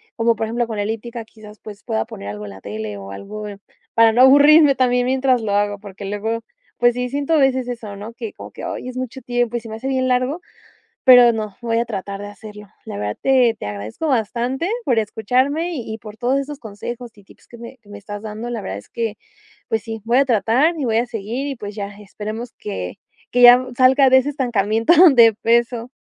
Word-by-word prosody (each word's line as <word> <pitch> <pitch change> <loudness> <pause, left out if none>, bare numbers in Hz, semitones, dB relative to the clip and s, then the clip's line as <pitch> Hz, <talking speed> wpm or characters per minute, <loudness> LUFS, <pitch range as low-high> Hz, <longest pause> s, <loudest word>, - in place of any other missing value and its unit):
como 230 0 +2
por 220 0 -3
ejemplo, 240 +2 -1
con 220 -2 -5
elíptica, 225 +3 -4
quizás, 215 -1 -15
pues, 210 -1 -11
pueda 110 0 -2
poner 100 +1 -8
algo 105 0 -7
en - - -8
la 95 0 -12
tele, 105 0 -6
o 100 0 -9
algo 210 - -8 0.5
para 225 -1 +5
no 245 - +4
aburrirme 285 +2 +7
también 250 -1 +2
mientras 260 -1 +2
lo 205 - -1
hago, 205 0 +1
porque 200 0 -10
luego, 210 +3 -2 0.4
pues, 240 0 +4
sí 250 0 -2
siento 285 +4 -1
a - - +4
veces 260 -2 +2
eso, 230 -4 -6
¿no?, 210 +3 -9
que 230 -2 -7
como - - -10
que - - -8
hoy 255 - -5
es 255 - -8
mucho 255 +1 -5
tiempo 245 -1 -1
y - - -3
se 225 0 -11
me 220 - -6
hace 245 +4 -6
bien 260 -1 0
largo. 255 +6 0 0.6
Pero 245 -2 +8
no, 215 -3 -5
voy 230 -1 0
a 235 - 0
tratar 200 -2 -5
de 205 - -6
hacerlo. 210 0 -11 0.2
La 100 - -7
verdad 105 0 -3
te 255 -4 +3
te - - -7
agradezco 105 - -5
bastante 250 - -1 0.2
por 240 -3 +2
escucharme, 260 - 0
y 225 -5 -5
y - - -7
por 215 0 -12
todos 255 +2 +1
esos 275 +1 -5
consejos 235 +3 -7
y 205 - -18
tips - - -21
que 235 - -12
me 235 +3 -11
que 205 - -23
me 205 - -10
estás 205 0 -8
dando, 220 +2 -6
La 235 -3 -3
verdad 95 - -5
es 105 - -15
que, 225 -2 -3 0.5
pues 220 -2 -1
sí, 225 -1 -7
voy 235 +3 +2
a 275 - +3
tratar 250 - +2
y 285 - -2
voy 225 -1 +1
a 240 - 0
seguir. 235 +4 -4
Y, 275 - -4
pues, 205 -2 -7
ya 200 -2 -4
esperemos 215 +3 -7
que 95 -3 -6 0.3
que 245 - +2
ya 245 +1 +9
salga 260 +1 +5
de 260 - +7
ese 260 - -1
estancamiento 225 - +1 0.2
de 230 -4 +6
peso. 235 +1 +1
230 Hz, 230 wpm, -20 LUFS, 210-255 Hz, 0.6 s, ya